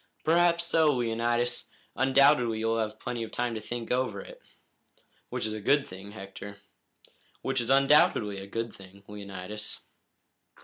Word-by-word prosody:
"Perhaps 170 +1 +3
so, 165 -2 +3
Leonidas. 120 0 0 0.3
Undoubtedly 130 -3 +4
you'll 115 +1 0
have 110 -1 -3
plenty 125 -2 -4
of 110 -1 -5
time 120 -1 -1
to 110 - -4
think 115 +1 -5
over 125 -5 0
it." - - -11 0.9
"Which - - -2
is 110 - -2
a 110 - -5
good 140 +6 +3
thing, 95 +2 -10
Hector." 100 0 -9 0.9
"Which 135 -1 0
is 120 - -4
undoubtedly 135 -7 +4
a 95 - -8
good 115 +2 -4
thing, 95 +1 -15
Leonidas." 100 0 -6
115 Hz, 145 wpm, -28 LUFS, 105-130 Hz, 0.9 s, Undoubtedly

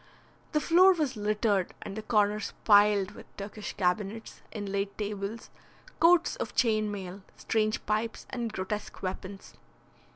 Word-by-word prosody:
The 300 - +3
floor 365 +5 +6
was 300 -7 -1
littered 210 -2 0
and 195 - -7
the 220 - -4
corners 210 -1 +1
piled 205 -2 +5
with - - -13
Turkish 205 +1 -6
cabinets, 200 +3 -2
inlaid 200 -1 -3
tables, 210 +1 -5 0.5
coats 340 +1 +5
of - - -5
chain 215 -4 +2
mail, 195 -1 -6 0.2
strange 215 -1 0
pipes, 215 +2 -2
and 235 -3 -3
grotesque 205 +1 -5
weapons. 190 +1 -6
210 Hz, 130 wpm, -29 LUFS, 200-225 Hz, 0.5 s, floor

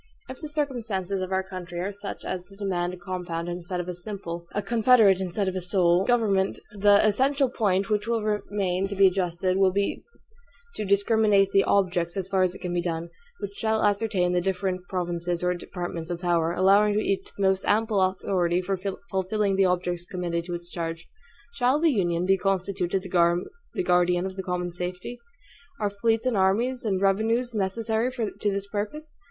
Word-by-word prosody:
If 260 0 -9
the 305 - -6
circumstances 225 - -2
of 185 0 -4
our 190 0 +1
country 180 -2 -7
are 190 +3 -2
such 200 0 -7
as 180 -1 -4
to 195 - -15
demand 180 -3 -2
a - - -14
compound 175 -2 -4
instead 175 +1 -4
of 175 - -4
a 180 - -3
simple, 175 -2 -7
a 205 - -2
confederate 220 -3 +5
instead 190 +2 -2
of 190 - -2
a 185 - -2
sole, 180 0 +3
government, 210 -6 +2 0.2
the 205 +1 +5
essential 265 +5 +2
point 200 -4 0
which 210 +1 0
will 230 -2 0
remain 200 -3 -1
to 200 - -5
be 195 0 +5
adjusted 185 0 +1
will 195 -1 +5
be 200 +2 -1 0.7
to 210 - -4
discriminate 200 0 +3
the 195 - +4
OBJECTS, 180 -3 +1
as 190 -1 -2
far 190 -1 +1
as 185 0 +1
it - - -11
can 180 -1 -2
be 175 - +1
done, 170 -1 -3 0.3
which 200 - -5
shall 220 +1 0
appertain 205 -3 +1
to 180 - +2
the - - -4
different 185 -1 -1
provinces 175 -1 -2
or 180 0 +2
departments 175 -1 -6
of 175 -1 -3
power; 170 -2 +1
allowing 200 +4 +4
to - - +3
each 195 -2 -1
the 200 - -1
most 190 0 +2
ample 215 -1 +2
authority 185 -2 +1
for 190 +1 -2 0.3
fulfilling 195 +1 0
the 195 0 +4
objects 180 -1 -1
committed 175 -2 -3
to 175 -1 -4
its 175 0 -8
charge. 165 -1 -4 0.5
Shall 265 +1 +2
the 325 0 +4
Union 175 -4 0
be 195 0 +3
constituted 190 -1 -1
the 180 - 0
guardian 180 - +2
of 190 0 -5
the 190 - -3
common 180 -1 -3
safety? 180 +7 -5 0.6
Are 205 -2 0
fleets 225 +3 0
and 255 -3 +1
armies 230 +7 +1
and 195 -3 +1
revenues 225 +5 +1
necessary 220 +4 -1
to 220 -4 -2
this 200 0 -2
purpose? 215 +10 -5
190 Hz, 190 wpm, -26 LUFS, 180-210 Hz, 0.7 s, confederate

